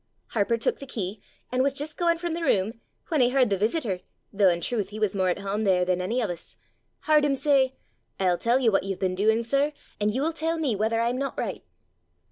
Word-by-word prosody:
Harper 230 +1 +1
took 230 - 0
the 275 - -9
key, 200 -3 -4 0.3
an' 255 0 +1
was 275 +1 +2
jist 295 +2 -4
gaein' 340 -1 +2
from 345 -1 -3
the 340 - -3
room, 225 - +1 0.3
when 310 -5 +2
he 245 - +5
h'ard 255 -4 +3
the - - +4
visitor 215 - 0 0.3
though 200 -1 +5
in 170 -1 +1
truth 210 0 -2
he 210 - -8
was 215 -3 0
more 190 -2 +1
at 180 - 0
hame 200 +2 -2
there 185 -3 +3
than 180 0 0
any 220 +7 -1
of 215 - -1
us 170 -1 -10 0.5
h'ard 305 -1 +5
him 285 -2 +2
say, 270 -2 +2 0.4
'I'll 180 -2 +2
tell 235 +2 +3
you 245 -4 +3
what 195 - +3
you've 195 -1 -3
been 185 -1 0
doing, 220 +4 +2
sir, 280 +5 +1 0.3
and 210 0 +2
you'll 285 +8 0
tell 325 +1 -1
me 285 -9 0
whether 220 +3 0
I'm 240 +2 0
not 275 0 -3
right! - - -3
230 Hz, 235 wpm, -26 LUFS, 195-275 Hz, 0.5 s, he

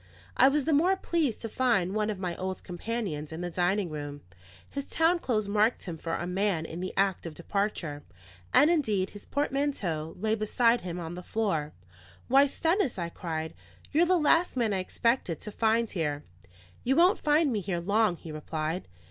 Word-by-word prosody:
I 265 - +7
was 280 0 +2
the 320 - +2
more 350 +7 +4
pleased 325 - -1
to 230 - -3
find 225 -6 +1
one 215 0 0
of 210 - -2
my 180 -2 -3
old 185 0 -4
companions 180 -5 -4
in 160 +2 -5
the 175 0 -3
dining 180 +1 0
room; 145 -1 -6 0.5
his 280 -1 -5
town 330 +2 +2
clothes 215 -9 0
marked 210 +3 +2
him 175 -3 -5
for 165 +1 -3
a - - -3
man 180 -2 0
in 165 +1 -6
the 185 +1 -3
act 195 -3 +1
of 160 - -8
departure; 170 -5 -2 0.5
and 295 +5 +6
indeed 215 - +1
his 205 - -12
portmanteau 270 - -1
lay 215 +3 0
beside 230 +2 +2
him 180 -1 -5
on 165 -1 -5
the 180 - -6
floor. 180 -7 -1 0.5
"Why, 275 +3 +6
Stennis," 325 - 0
I 170 -2 -2
cried, 160 -2 -4 0.4
"you're 335 +4 +4
the 365 0 +4
last 330 -1 +3
man 225 -4 +1
I 190 - 0
expected 185 -2 0
to 210 - -6
find 225 +1 +1
here." 150 -5 -2 0.6
"You 265 +2 +2
won't 360 +6 +5
find 300 -2 +3
me 215 - 0
here 185 -3 -2
long," 205 +2 +2
he 165 -1 -10
replied. 155 +3 -3
205 Hz, 190 wpm, -29 LUFS, 170-260 Hz, 0.6 s, I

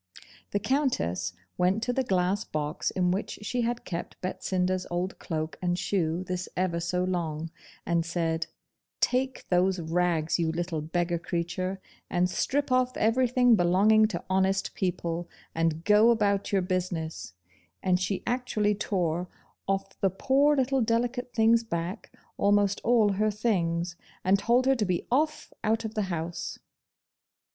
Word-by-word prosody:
The - - 0
Countess 210 - 0 0.3
went 185 +5 +2
to 245 - 0
the 265 - +1
glass 190 -1 +1
box 150 -3 -2
in 180 -1 +1
which 195 +3 -3
she 245 +4 -1
had 240 +1 -2
kept 170 -1 -5
Betsinda's 185 0 -1
old 180 +2 -3
cloak 155 -2 -4
and 175 -1 0
shoe 175 -3 0
this 185 0 -4
ever 180 -2 0
so 180 +2 -1
long, 165 -3 -2 0.3
and 170 -1 +1
said, 165 -1 -1 0.5
'Take 260 +1 0
those 185 +1 +2
rags, 165 -1 +1
you 165 -1 +1
little 170 -1 -2
beggar 170 +2 -1
creature, 175 +3 -3 0.3
and 180 -1 +2
strip 280 +6 0
off 255 0 +2
everything 245 +1 +4
belonging 205 +4 +4
to 220 - -5
honest 190 +1 +1
people, 175 -2 -2 0.2
and 165 0 0
go 210 +4 +6
about 205 -4 +2
your 195 -2 +2
business'; 180 - -3 0.5
and 180 -1 +3
she 190 +1 -2
actually 240 -4 +1
tore 180 -4 -1 0.4
off 195 0 -2
the 195 - +4
poor 275 +10 +3
little 265 0 +2
delicate 240 +2 0
thing's 230 0 +4
back 175 0 -4 0.3
almost 205 0 +2
all 230 -3 +4
her 210 +2 +1
things, 175 -6 0 0.3
and 195 +1 +3
told 240 +4 +3
her 270 - +5
to 230 -5 0
be 180 -2 -1
off 305 +4 0
out 225 +1 +1
of 220 - -4
the 210 -3 -1
house. 170 0 -4
190 Hz, 150 wpm, -28 LUFS, 175-225 Hz, 0.5 s, go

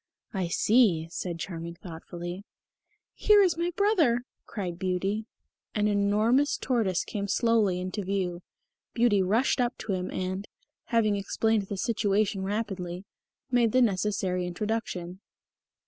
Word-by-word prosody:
"I 190 -3 -1
see," 190 -3 +3
said 175 -1 -4
Charming 170 -1 -6
thoughtfully. 175 +2 -7 0.7
"Here 415 -1 +5
is 360 -4 +2
my 340 +1 -1
brother," 335 - +3 0.3
cried 180 -5 -5
Beauty. 195 +4 -1 0.5
An 210 0 +2
enormous 210 +7 +2
tortoise 220 -9 0
came 200 -1 -3
slowly 215 -4 +2
into 185 +3 -4
view. 185 -2 -2 0.5
Beauty 230 -5 +4
rushed 225 +8 +2
up 245 0 -1
to 210 - -3
him 185 0 -2
and, 185 +2 -3 0.4
having 215 -4 +2
explained 215 +1 0
the 200 - -4
situation 205 -1 +1
rapidly, 190 -3 -3 0.5
made 235 -3 +3
the 255 - +5
necessary 190 -3 0
introduction. 185 -2 -3
200 Hz, 125 wpm, -28 LUFS, 180-230 Hz, 0.7 s, Here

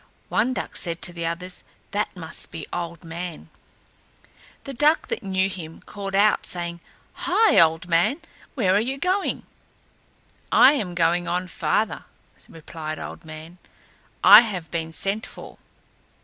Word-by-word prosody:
One 255 - +1
duck - - -5
said 170 -1 -2
to 175 - 0
the 170 -1 -3
others, 180 +2 -6 0.3
"That 205 -1 -2
must 160 -2 -5
be 160 - -6
Old 170 -2 -5
Man." 170 0 -7 1.1
The 275 - -7
duck 295 +5 +2
that - - -2
knew 190 -2 +1
him 170 -4 -8
called 195 -1 -6
out, 210 +2 +4
saying, 170 -1 -3 0.5
"Hi, 445 0 +5
Old 165 +1 +3
Man, 180 - +2 0.4
where 195 -9 +2
are 200 - +4
you 265 +4 -2
going?" 370 +6 -1 1.1
"I 265 - +8
am 190 -11 -3
going 175 +1 +2
on 180 +2 -1
farther," 170 +5 -1 0.4
replied 155 -1 -7
Old - - -8
Man, 160 +3 -10 0.6
"I - - +11
have 180 -9 -5
been 165 -1 -3
sent 200 +6 -2
for." - - -11
180 Hz, 145 wpm, -24 LUFS, 165-205 Hz, 1.1 s, I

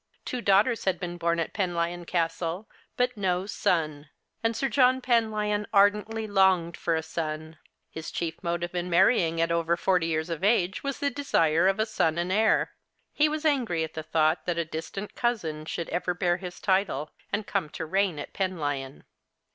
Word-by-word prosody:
Two 250 - -3
daughters 210 +3 +3
had 185 -2 +1
been 175 -2 -5
born 170 0 +1
at 165 - -2
Penlyon 175 -3 -1
Castle, 170 +3 -1 0.3
but 250 0 +1
no 185 -2 0
son. 155 -7 -1 0.3
And 225 0 +1
8ir 270 +5 0
John 255 +1 +4
Penlyon 215 -4 +1
ardently 210 +2 +3
longed 190 -4 +3
for 165 - 0
a 160 - -1
son. 155 -1 -5 0.3
His 160 - -6
chief 160 -2 -4
motive 175 0 -2
in 180 0 -2
marrying 170 -2 +3
at 165 0 +2
over 170 0 +1
forty 180 -2 +2
years 160 +1 -1
of 165 +2 -4
age 195 -3 +2
was 275 -1 -2
the 285 0 0
desire 170 - +2
of 195 +2 +1
a 220 - +3
son 165 -7 0
and 175 +2 -1
heir. 215 +3 +3 0.4
He 300 +1 +3
was 310 +1 -3
angry 240 - +1
at 160 - -6
the 155 - -4
thought 155 +1 +1
that 175 -1 0
a 170 - 0
distant 165 +6 -6
cousin 165 -11 -2
should 170 +1 -4
ever 180 0 -1
bear 175 -1 +1
his 180 -1 -8
title, 185 -6 0 0.2
and 205 0 -1
come 190 -8 -1
to 160 - -5
reign 190 0 +1
at 145 - -7
Penlyon. 145 -8 -3
180 Hz, 185 wpm, -27 LUFS, 165-210 Hz, 0.4 s, John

